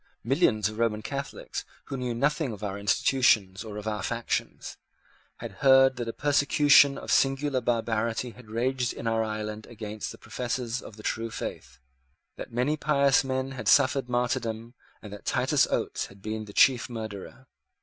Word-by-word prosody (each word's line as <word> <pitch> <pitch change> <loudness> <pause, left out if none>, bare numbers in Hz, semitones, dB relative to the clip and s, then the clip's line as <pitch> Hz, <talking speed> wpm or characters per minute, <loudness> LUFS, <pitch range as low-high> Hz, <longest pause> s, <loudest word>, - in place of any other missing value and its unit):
Millions 110 -4 +2
of 110 +1 -7
Roman 110 -2 0
Catholics, 140 +3 -5 0.2
who 140 - -5
knew 125 -2 -3
nothing 145 +2 0
of 105 - -10
our 100 -1 -3
institutions 100 -2 +2
or 105 -2 -8
of 105 +1 -6
our 105 -1 -2
factions, 115 -1 -3 0.6
had - - -7
heard 135 -1 +6
that 120 -1 -4
a - - -1
persecution 145 0 +4
of - - -5
singular 135 0 +2
barbarity 115 0 -1
had 120 -2 -16
raged 125 +2 -1
in - - -8
our 115 0 +1
island 110 0 -5
against 110 -2 -6
the - - -11
professors 125 -1 -3
of 105 - -11
the 105 - -12
true 115 +1 -2
faith, 65 - -7 0.6
that - - -8
many 125 +6 0
pious 140 -2 +3
men 130 0 -2
had 130 -2 -6
suffered 135 -2 +4
martyrdom, 120 -2 -2 0.3
and 105 -2 -9
that 105 - -10
Titus - - +2
Oates - - -2
had 95 0 -18
been 110 0 -4
the 100 - -11
chief 130 +1 +4
murderer. 110 +2 -7
120 Hz, 170 wpm, -27 LUFS, 110-135 Hz, 0.6 s, heard